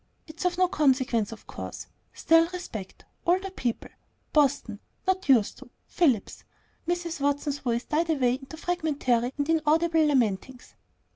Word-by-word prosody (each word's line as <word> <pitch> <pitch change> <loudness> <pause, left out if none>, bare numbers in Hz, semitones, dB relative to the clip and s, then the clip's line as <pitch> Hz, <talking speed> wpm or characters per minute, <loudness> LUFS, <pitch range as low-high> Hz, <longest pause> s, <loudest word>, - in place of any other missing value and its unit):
It's 325 +2 -8
of 355 -1 +1
no 365 0 +4
consequence, 260 - +1
of 225 - -11
course, - - -7 0.3
still, 330 0 +4
respect 335 - -8 0.2
older 375 +3 +1
people 245 -10 -3 0.4
Boston 275 -8 +2 0.3
not 375 -3 0
used 235 -6 +4
to - - -13 0.2
Phillips 270 - 0 0.2
" - - -39
Mrs. 345 -2 -2
Watson's 285 0 0
voice 240 -1 -1
died 325 +2 0
away 260 -6 +2
into 270 +4 -8
fragmentary 285 -8 0
and 285 0 -1
inaudible 320 +1 +3
lamentings. 250 -2 -1
290 Hz, 140 wpm, -27 LUFS, 250-335 Hz, 0.4 s, no